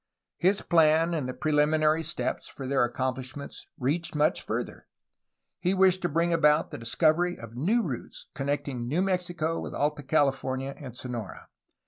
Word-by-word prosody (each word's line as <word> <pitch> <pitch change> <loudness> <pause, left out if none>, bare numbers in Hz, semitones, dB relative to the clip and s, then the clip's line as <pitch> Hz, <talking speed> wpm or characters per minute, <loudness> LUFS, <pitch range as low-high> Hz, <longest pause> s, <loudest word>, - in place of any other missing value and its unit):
His 190 +3 +2
plans 165 0 +4
and 145 -6 -2
the - - -3
preliminary 155 +1 +2
steps 165 +2 -3
for 135 - -8
their 135 -1 +2
accomplish 130 +2 -2
ment 140 -1 -7 0.2
reached 155 +6 -1
much 150 +1 +2
further. - - -4 0.7
He 180 +2 +1
wished 185 -1 +4
to 175 - 0
bring 170 +3 +1
about 150 -1 +3
the - - -6
discovery 160 +9 +2
of 115 -1 -10
new 205 - +2
routes 135 - -6
connecting 140 -3 -2
New 160 +9 +1
Mexico 175 -4 -1
with - - -6
Alta 150 +1 0
California 135 -2 0
and 125 -4 -10
Sonora. 120 -6 -6
150 Hz, 155 wpm, -28 LUFS, 135-170 Hz, 0.7 s, plans